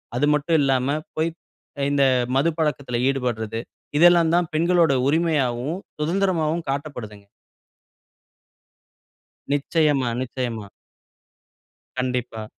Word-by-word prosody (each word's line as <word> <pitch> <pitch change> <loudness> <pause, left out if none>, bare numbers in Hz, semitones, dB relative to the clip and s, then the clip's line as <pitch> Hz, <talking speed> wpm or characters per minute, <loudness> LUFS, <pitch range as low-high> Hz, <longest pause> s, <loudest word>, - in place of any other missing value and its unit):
அது 135 +4 +2
மட்டும் 155 +3 +2
இல்லாம 135 +1 +1 0.2
போயி 160 +1 +1 0.5
அ - - -1
இந்த 140 -1 +3 0.3
மது 145 +5 +3
பழக்கத்தில 140 -6 -1
ஈடுபட்றது 115 -5 -2 0.4
இதெல்லாம் 170 -1 +6
தான் 175 -2 +1
பெண்களுடைய 165 -3 +3
உரிமையாவும், 150 -2 0 0.2
சுதந்திரமாவும் 170 -1 0
காட்டப்படுதுங்க. 125 -8 -5 2.3
நிச்சயமா, 145 -2 +1
நிச்சயமா. 120 -4 -4 1.3
கண்டிப்பா. 125 -3 -2
145 Hz, 85 wpm, -23 LUFS, 125-160 Hz, 2.3 s, இதெல்லாம்